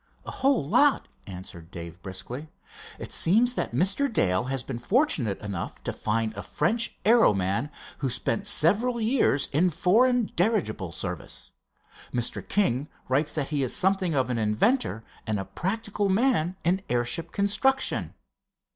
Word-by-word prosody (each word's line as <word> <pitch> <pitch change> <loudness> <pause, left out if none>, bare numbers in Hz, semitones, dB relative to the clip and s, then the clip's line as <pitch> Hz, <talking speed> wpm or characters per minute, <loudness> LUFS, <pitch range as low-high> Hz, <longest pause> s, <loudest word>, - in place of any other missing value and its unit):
"A - - -6
whole 265 - +1
lot," 280 - +3 0.2
answered 90 -3 -9
Dave, 85 0 -9
briskly. 120 +10 -6 0.5
"It - - -8
seems 230 +8 +4
that - - -2
Mr. 195 - +2
Dale 95 - +1
has 135 -1 -2
been 125 -3 -5
fortunate 135 - +1
enough 100 -4 -6
to - - -3
find 110 0 -1
a - - -6
French 220 +10 -1
aero 225 - +5
man 100 +9 -1 0.3
who 135 - -1
spent 200 +11 -1
several 210 +7 +3
years 220 - +2
in 170 +6 +3
foreign 225 +9 +3
dirigible 170 - 0
service. 85 - -5 0.6
Mr. 120 -1 -1
King 150 - 0 0.2
writes 140 +4 +2
that 145 -3 -2
he 145 -2 0
is 130 - +1
something 190 -3 +1
of 130 -2 +1
an 120 - -1
inventor 110 - +1 0.2
and 110 -2 -1
a 95 - -4
practical 200 - -2
man 190 -5 +1
in 180 +3 +1
airship 120 +7 -1
construction." 215 +7 +1
155 Hz, 145 wpm, -26 LUFS, -, 0.6 s, aero